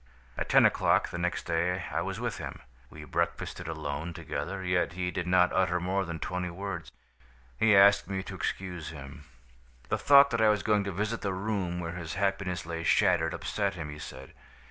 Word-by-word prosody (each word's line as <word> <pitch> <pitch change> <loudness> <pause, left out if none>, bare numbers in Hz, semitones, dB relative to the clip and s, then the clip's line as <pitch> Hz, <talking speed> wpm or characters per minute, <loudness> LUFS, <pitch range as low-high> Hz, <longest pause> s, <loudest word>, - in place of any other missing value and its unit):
"At - - -3
ten - - +6
o'clock - - +3
the 85 - -5
next 90 0 -1
day 85 +2 0
I - - 0
was - - -4
with - - -3
him. - - -7 0.3
We 75 - -10
breakfasted 80 +3 -3
alone 80 +1 -4
together, 95 +2 -4
yet 90 -2 +1
he 90 0 -2
did 90 -1 -3
not 90 0 +4
utter 90 -1 +2
more 95 +2 -1
than 85 -1 -5
twenty 90 +2 -3
words. 95 -1 -6 0.6
He 110 - +4
asked 100 0 +6
me 95 -1 -2
to 100 - -8
excuse 90 -2 -4
him. 75 0 -10 0.6
The - - 0
thought 140 0 +7
that 115 -1 0
I 110 - +6
was 105 -1 +1
going 105 -2 +2
to 100 - -2
visit 105 +5 -2
the 100 -2 -1
room 95 -3 -2
where 85 -1 -4
his 85 -2 -6
happiness 95 -3 -1
lay 85 0 -4
shattered, 85 -1 +3
upset 100 -2 -2
him, 80 -4 -6
he 75 - -9
said. 65 -2 -9
90 Hz, 195 wpm, -29 LUFS, 85-100 Hz, 0.6 s, thought